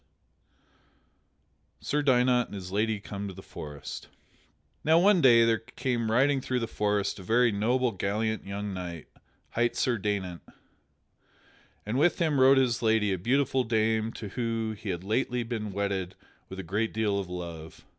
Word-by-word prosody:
[Sidenote: - - -17
Sir 150 +1 +1
Daynant 125 -3 +3
and - - -9
his 95 -2 -7
lady 105 +1 0
come 100 0 -6
to 95 - -8
the 95 - -11
forest] 75 -1 -8 0.8
Now 160 +2 +5
one 185 +1 +5
day 115 -4 +7
there 115 -1 +2
came 120 0 -2
riding 135 +4 +3
through 125 -1 -1
the - - 0
forest 105 -3 -1
a - - -9
very 115 +5 +3
noble, 120 +5 +1
gallant 105 +3 -2
young 100 0 -5
knight, 90 -3 -7 0.4
hight 120 +1 0
Sir 120 -3 +1
Daynant, 95 -4 -2 1.4
and 110 +5 -1
with 170 +4 +3
him 155 -5 +1
rode 135 +1 +6
his 125 -3 +2
lady, 110 -3 +2
a 95 - -3
beautiful 130 +5 +1
dame 110 -1 +1
to 105 - -7
whom 115 -1 -2
he 105 0 -7
had 90 -1 -3
lately 120 +4 0
been 110 -3 -4
wedded 95 -2 -2 0.3
with 95 - -8
a 95 - -5
great 105 +7 -2
deal 105 -3 +1
of 95 -2 -5
love. 85 -3 -8
110 Hz, 165 wpm, -28 LUFS, 100-125 Hz, 1.4 s, day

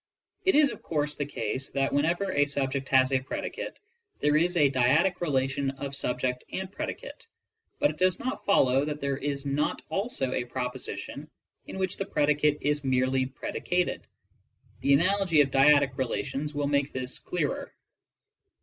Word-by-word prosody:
It 380 - +4
is 295 -1 +5
of - - -9
course 150 -2 -1
the 145 -1 -3
case 130 0 -3
that, 135 0 0
whenever 170 +7 +1
a 145 -4 +3
subject 135 -1 -2
has 130 0 +4
a 130 - +3
predicate, 130 - -5 0.4
there 150 0 +2
is 175 +3 +2
a 150 -3 +6
dyadic 145 +9 +3
relation 135 -3 0
of 140 +1 -5
subject 125 -1 -1
and 190 0 -4
predicate, - - -6 0.5
but 290 0 +3
it - - -13
does 185 -1 +3
not 255 - -4
follow 135 -9 +4
that 150 0 -3
there 140 -1 -1
is 140 -1 -3
not 140 +2 -1
also 175 - -1
a 130 - -1
proposition 125 0 -5 0.4
in - - -7
which 190 0 -1
the 195 - -2
predicate 150 -3 +2
is 145 0 0
merely 130 0 +1
predi 130 - -6
cated. 180 0 0 0.8
The 140 - +3
analogy 180 +1 +4
of 135 -2 +1
dyadic 140 -1 +5
relations 135 +3 -2
will 145 0 0
make 140 0 +1
this 130 0 -4
clearer. 165 -6 -3
145 Hz, 165 wpm, -28 LUFS, 135-165 Hz, 0.8 s, a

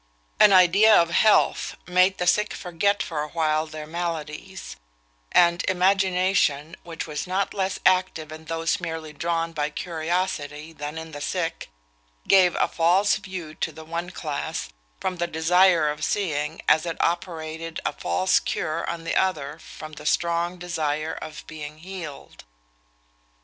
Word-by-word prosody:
An 210 - +8
idea 195 +4 +7
of 170 0 +2
health 215 +4 +3
made 185 +1 +3
the 180 - -1
sick 210 +4 +2
forget 200 +3 0
for 155 -3 -3
a 150 - -3
while 155 -1 0
their 155 -1 -7
maladies; 170 +2 -5 0.6
and 170 0 +4
imagination, 185 -4 +2
which 170 -1 -6
was 150 +2 -5
not 190 +2 -1
less 190 -1 -1
active 185 -4 +2
in 155 0 -10
those 165 +4 -1
merely 160 -2 -5
drawn 165 +2 -1
by 150 -2 -1
curiosity 160 -2 -3
than 150 0 -6
in 160 0 -7
the 145 -1 -8
sick, 170 +1 -3 0.6
gave 185 -2 +5
a - - +2
false 180 +5 +3
view 180 -5 -7
to - - -3
the 160 - -11
one 170 +2 -4
class, 150 - -4 0.3
from 185 -1 -2
the 175 0 -1
desire 170 0 +4
of 150 0 -3
seeing, 155 -5 -1
as 160 +2 +4
it 165 - -3
operated 165 -1 -2
a - - 0
false 190 0 +2
cure 165 +1 -2
on 170 -1 -4
the 165 - -2
other 155 -5 0
from 155 -1 -10
the 150 0 -7
strong 170 +1 +1
desire 160 -3 -2
of 155 -1 -8
being 150 -1 -8
healed. 170 -4 -9
165 Hz, 150 wpm, -24 LUFS, 155-185 Hz, 0.6 s, An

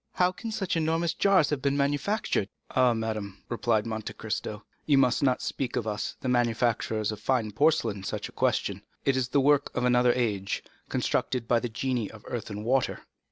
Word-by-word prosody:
How 180 0 +3
can 225 +5 -6
such 195 -5 -1
enormous 165 +1 +1
jars 190 -7 +3
have 145 -3 -1
been 140 +1 +1
manufactured?" 145 - 0 0.2
"Ah! 125 -2 +4
madame," 110 -3 -4
replied 115 -2 +1
Monte 110 -1 -4
Cristo, 105 -1 -4 0.2
"you 145 -2 +5
must 125 -3 +3
not 130 -3 +2
ask 130 -3 -3
of 115 - -1
us, 105 -1 -3
the - - -3
manufacturers 115 -3 +1
of 105 - -6
fine 115 -1 0
porcelain, 115 -5 +2
such - - -3
a - - -13
question. - - 0 0.2
It 135 - +3
is 130 -2 +1
the 135 +3 +2
work 145 +1 +3
of 125 - +1
another 125 0 +4
age, 105 -6 -1 0.3
constructed 125 -3 -1
by 120 0 +4
the 120 - -3
genii 120 -1 -1
of 110 -2 -13
earth 120 -2 -4
and 105 0 -6
water." 130 +1 +1
125 Hz, 190 wpm, -28 LUFS, 110-140 Hz, 0.3 s, you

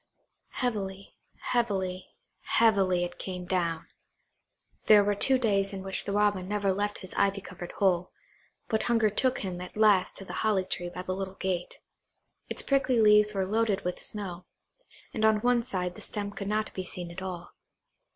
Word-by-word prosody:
Heavily, 200 -6 -3 0.2
heavily, 190 -6 -1 0.3
heavily, 195 -6 +3
it 175 - -6
came 180 -1 -5
down. 170 -3 -1 1.0
There 210 -1 +8
were 205 0 +1
two 260 +6 +4
days 200 -5 +1
in 190 -1 -5
which 190 0 -1
the - - -3
Robin 205 -2 +1
never 200 -1 0
left 205 +2 -1
his 185 - -6
ivy 200 0 +2
covered 180 -2 -9
hole, 180 -2 +1 0.6
but 220 - +1
hunger 225 -3 +2
took 255 +4 +1
him 180 -3 -4
at 180 +3 -9
last 210 -4 +4
to 195 - -9
the 180 - -8
holly 205 -4 +2
tree 175 -1 -4
by 180 +1 -7
the 185 - -3
little 190 0 -5
gate. 185 -2 -3 0.7
Its - - +1
prickly 270 -3 +2
leaves 210 -1 +5
were 190 -1 +1
loaded 210 0 +1
with 180 0 -3
snow, 185 -4 -6 0.7
and 220 - -2
on 220 -1 +5
one 245 0 +3
side 185 -7 -3
the - - -12
stem 205 -1 -3
could 200 -1 -6
not 215 +1 -1
be 185 - -4
seen 180 -1 -5
at 170 - -8
all. 180 -2 -6
195 Hz, 175 wpm, -28 LUFS, 185-215 Hz, 1.0 s, There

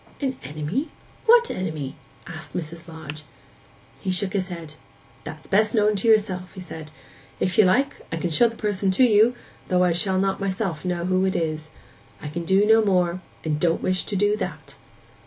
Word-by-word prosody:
'An 265 -2 -1
enemy? 155 - -3 0.4
What 475 +1 +6
enemy?' 155 -6 -4 0.3
asked 170 -1 -9
Mrs. 170 0 -6
Lodge. 155 -2 -8 0.8
He - - -4
shook 185 +1 0
his 190 -3 0
head. 165 -4 -8 0.5
'That's 155 0 -8
best 215 +3 +2
known 210 -1 +3
to 195 - 0
yourself,' 195 -5 +2
he - - -8
said. 160 -3 -8 0.5
'If 185 - 0
you 215 - +8
like, 265 +10 +2
I 165 - -2
can 170 +1 -2
show 235 +9 +5
the 230 - -11
person 205 -3 0
to - - +6
you, 230 +1 +5 0.3
though 180 0 +3
I 180 - +3
shall 185 +3 0
not 195 0 +1
myself 190 -5 -2
know 175 -2 -2
who 185 +1 +2
it 190 - 0
is. 155 -1 -2 0.5
I 150 - -6
can 170 +3 -4
do 190 +4 +4
no 220 +1 +5
more; 180 -3 +1 0.2
and 150 -2 -1
don't 165 0 +1
wish 185 0 0
to 205 - -4
do 205 +2 +3
that. - - -6
185 Hz, 190 wpm, -24 LUFS, 165-210 Hz, 0.8 s, you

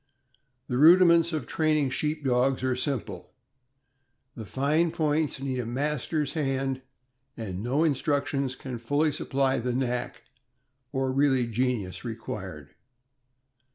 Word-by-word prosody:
The 125 0 -1
rudiments 170 +1 +7
of 155 -6 -3
training 155 -3 +1
Sheep 150 +2 -2
Dogs 130 +1 +2
are 130 -1 +1
simple; 135 0 -4 1.0
the 110 -5 -8
fine 150 - +1
points 155 -3 0
need 130 -2 -3
a 125 - -2
master's 145 +3 -1
hand, 135 -3 -1 0.6
and 100 -5 -5
no 130 +7 +1
instructions 140 -2 0
can 130 -3 -7
fully 145 +6 +1
supply 135 -1 0
the 125 +1 -2
knack, 125 -1 -2 0.7
or 135 -1 0
really 135 -2 +2
genius, 115 -5 -2
required. 95 - -7
135 Hz, 120 wpm, -27 LUFS, 125-150 Hz, 1.0 s, rudiments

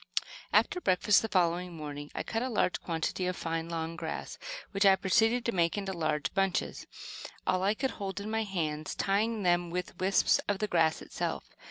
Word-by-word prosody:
* - - -12
After 360 - +3
breakfast 190 - +4
the 225 - -2
following 175 -1 +1
morning, 145 -1 -6
I - - -2
cut 225 - -2
a 255 - -1
large 210 -5 +1
quantity 170 +2 -2
of 180 - -1
fine, 165 0 -3
long 165 0 -3
grass, 160 -1 -5 0.3
which 195 0 +1
I 195 -1 +7
proceeded 225 +5 +2
to 235 - +2
make 170 -1 +1
into 195 -1 -2
large 155 -4 -1
bunches, 195 -2 0 0.6
all 185 0 +2
I 200 +3 +2
could 265 +3 -1
hold 195 -1 -4
in 200 - -5
my 225 0 +1
hands, 155 -7 -2
tieing 210 +2 +1
them 175 -1 +2
with 180 0 -4
wisps 190 +1 +4
of 205 - +1
the 210 - 0
grass 165 -4 +2
itself. - - -3
185 Hz, 195 wpm, -30 LUFS, 165-205 Hz, 0.6 s, I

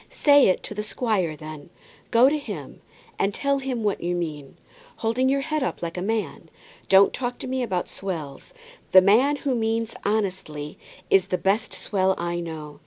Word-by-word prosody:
"Say 285 -2 +5
it 185 - +1
to - - -6
the 210 - -3
squire, 210 -7 -1
then. 155 0 -10 0.4
Go 240 +2 +6
to 300 +2 +1
him, 285 - -8 0.4
and 195 - +2
tell 280 0 +1
him 260 -4 -3
what 205 -1 0
you 175 +1 -1
mean, 150 -5 -5 0.4
holding 240 +4 0
your 275 +1 +2
head 305 +2 -2
up 260 - -3
like 170 0 -4
a 180 - -3
man. 220 +2 -3 0.4
Don't 195 +1 +6
talk 245 -1 -3
to - - -6
me 260 0 -1
about 190 -7 -1
swells. 160 -8 -6 0.4
The 185 - +10
man 245 +9 +4
who 275 -1 -2
means 225 -1 -1
honestly 185 -8 -2 0.3
is 195 -1 +4
the 180 - 0
best 200 +4 0
swell 190 -2 0
I 175 0 -2
know. 155 -3 -7
200 Hz, 180 wpm, -24 LUFS, 175-245 Hz, 0.4 s, The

